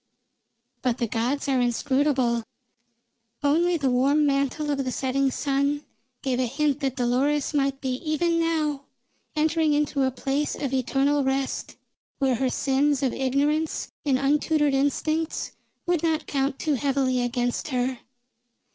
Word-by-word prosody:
But 250 -2 0
the 240 - 0
gods 240 +6 -1
are 265 -2 +2
inscrutable. 250 0 +1 1.0
Only 335 +5 +3
the 275 -4 +1
warm 280 +4 +3
mantle 280 +1 0
of 275 -1 0
the 255 - -2
setting 270 +1 0
sun 280 +2 0 0.4
gave 260 -2 0
a 255 - +1
hint 290 +2 0
that 270 -3 -1
Dolores 265 +5 +1
might 275 -1 0
be 255 -2 -1
even 335 +3 0
now 305 -4 0 0.5
entering 315 0 +2
into 290 -1 +1
a 265 - +3
place 275 +3 -2
of 275 -2 -3
eternal 275 +2 +1
rest, 265 0 -2 0.4
where 270 -2 +2
her 255 +2 0
sins 280 +2 +1
of 260 - +1
ignorance 290 +4 0
and 275 -3 +2
untutored 295 +1 +2
instincts 310 +4 0 0.3
would 350 -3 +1
not 320 -2 0
count 275 -1 -1
too 310 - 0
heavily 265 -1 +1
against 245 0 -1
her. 255 -2 -1
275 Hz, 140 wpm, -25 LUFS, 260-295 Hz, 1.0 s, Only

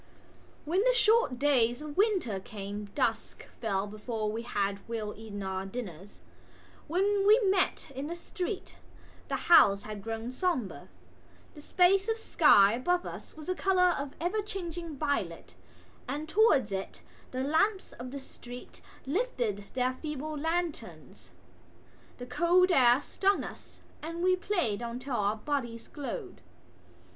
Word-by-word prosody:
When 360 +6 +2
the - - +3
short 445 - +3
days 245 -3 +3
of 300 -1 -7
winter 380 - +1
came 205 +1 -6
dusk - - -1
fell 200 -4 -1
before 215 +1 -3
we 225 +2 -3
had 200 -4 -1
well 215 -2 -3
eaten 210 -2 -7
our 190 0 -3
dinners. 195 -3 -8 0.7
When 390 +5 +2
we 430 +3 +8
met 380 -7 +1
in 270 +2 -4
the 340 - -4
street 365 +3 -5 0.5
the - - -1
houses 200 -12 +6
had 215 -1 -7
grown 225 +2 -4
sombre. 255 - -2 0.6
The 295 - -11
space 380 +6 +3
of 450 - +1
sky 260 - +5
above 350 +9 0
us - - -9
was 310 - -9
the 370 - 0
colour 365 -1 +3
of 280 0 -5
ever 360 +6 0
changing 345 -6 -6
violet 285 0 -2 0.5
and 295 +4 -4
towards 315 - +4
it 190 0 -5 0.3
the 255 0 -3
lamps 380 +8 +1
of 245 +1 -8
the 280 - -6
street 245 -2 -11 0.2
lifted 255 - -1
their 255 0 +1
feeble 300 +2 -5
lanterns. 325 +2 -4 0.9
The 245 - -7
cold 350 +8 +3
air 250 -3 +5
stung 395 +6 +1
us - - -11 0.2
and 335 +2 -5
we 370 0 +4
played 355 - -1 0.2
till 255 0 -4
our 205 -1 +1
bodies 235 -1 -3
glowed. 365 - -6
285 Hz, 140 wpm, -30 LUFS, 225-360 Hz, 0.9 s, we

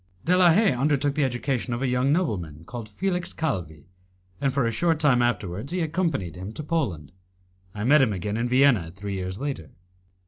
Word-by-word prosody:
De 180 - +4
la 180 -1 +6
Haye 200 +4 +4
undertook 145 +1 +1
the 150 0 +1
education 125 -1 -1
of 120 - -3
a - - +1
young 125 +2 +1
nobleman 90 - -1
called 115 -1 -7
Felix 180 - -2
Calvi, 85 - -3 0.6
and 140 - +2
a 115 -4 +2
short 165 +7 +1
time 140 -6 +4
afterwards 115 - -2
he 180 - -1
accompanied 160 - -1
him 95 +3 -7
to 155 - -6
Poland. 125 - -2 0.6
I 105 - -4
met 145 +5 +5
him 125 -5 +3
again 105 +2 -3
in 120 +2 -1
Vienna 125 -9 +4
three 100 +1 -5
years 95 0 -4
later. 135 - -4
125 Hz, 185 wpm, -25 LUFS, 100-150 Hz, 0.6 s, la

